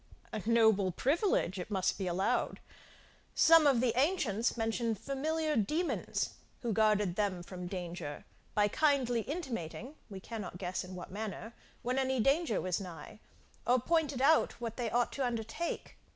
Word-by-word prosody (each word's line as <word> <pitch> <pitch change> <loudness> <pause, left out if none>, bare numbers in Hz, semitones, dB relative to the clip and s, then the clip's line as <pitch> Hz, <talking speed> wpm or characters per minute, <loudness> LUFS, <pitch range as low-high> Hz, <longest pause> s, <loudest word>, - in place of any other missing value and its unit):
A 215 - -2
noble 220 -5 +4
privilege, 275 - +1
it 180 - -5
must 190 -2 0
be 190 - -2
allowed. 180 +2 0 0.8
Some 325 -2 +7
of 260 -4 +4
the 240 -2 +1
ancients 255 - +1
mention 225 0 0
familiar 305 +6 -1
demons, 305 - 0 0.3
who 235 -2 0
guarded 210 -4 +3
them 195 -4 0
from 180 -1 -7
danger, 175 -5 -5 0.3
by 210 0 +4
kindly 265 -3 +2
intimating 255 - -5 0.2
(we 195 -2 -7
cannot 210 -3 -6
guess 180 0 -3
in 185 0 -9
what 180 - -8
manner,) 220 +2 -5 0.3
when 255 +2 0
any 265 -1 +1
danger 275 - +2
was 185 +1 -1
nigh; 170 0 -9 0.5
or 250 +1 +5
pointed 295 -2 +1
out 315 -3 +4
what 230 -2 -4
they 240 -3 -2
ought 240 +2 +1
to 275 - -2
undertake. 235 +7 -3
225 Hz, 150 wpm, -33 LUFS, 195-270 Hz, 0.8 s, Some